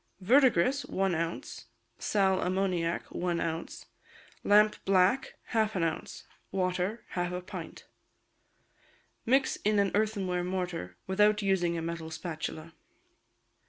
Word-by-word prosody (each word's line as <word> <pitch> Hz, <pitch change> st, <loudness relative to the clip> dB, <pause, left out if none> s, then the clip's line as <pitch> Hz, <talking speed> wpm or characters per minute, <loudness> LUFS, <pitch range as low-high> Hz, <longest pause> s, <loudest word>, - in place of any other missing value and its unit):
Verdigris, 255 Hz, +3 st, +4 dB
one 195 Hz, -1 st, 0 dB
ounce; 165 Hz, -9 st, -4 dB, 0.3 s
sal 190 Hz, -2 st, +2 dB
ammoniac, 180 Hz, -2 st, 0 dB
one 175 Hz, -1 st, -1 dB
ounce; 165 Hz, 0 st, -4 dB, 0.6 s
lampblack, 205 Hz, +2 st, +3 dB, 0.2 s
half 220 Hz, -2 st, +1 dB
an 180 Hz, -, +1 dB
ounce; 165 Hz, -, -3 dB, 0.3 s
water, 185 Hz, +3 st, -1 dB
half 175 Hz, 0 st, -2 dB
a 180 Hz, -, -3 dB
pint. 180 Hz, -, -8 dB, 1.4 s
Mix 265 Hz, +3 st, +3 dB
in 210 Hz, 0 st, +1 dB
an 200 Hz, -1 st, +2 dB
earthenware 200 Hz, -4 st, 0 dB
mortar, 180 Hz, -, -4 dB
without 210 Hz, +2 st, +3 dB
using 175 Hz, -3 st, +1 dB
a 165 Hz, -, -3 dB
metal 165 Hz, -1 st, -4 dB
spatula. 160 Hz, 0 st, -6 dB
185 Hz, 110 wpm, -30 LUFS, 170-205 Hz, 1.4 s, Verdigris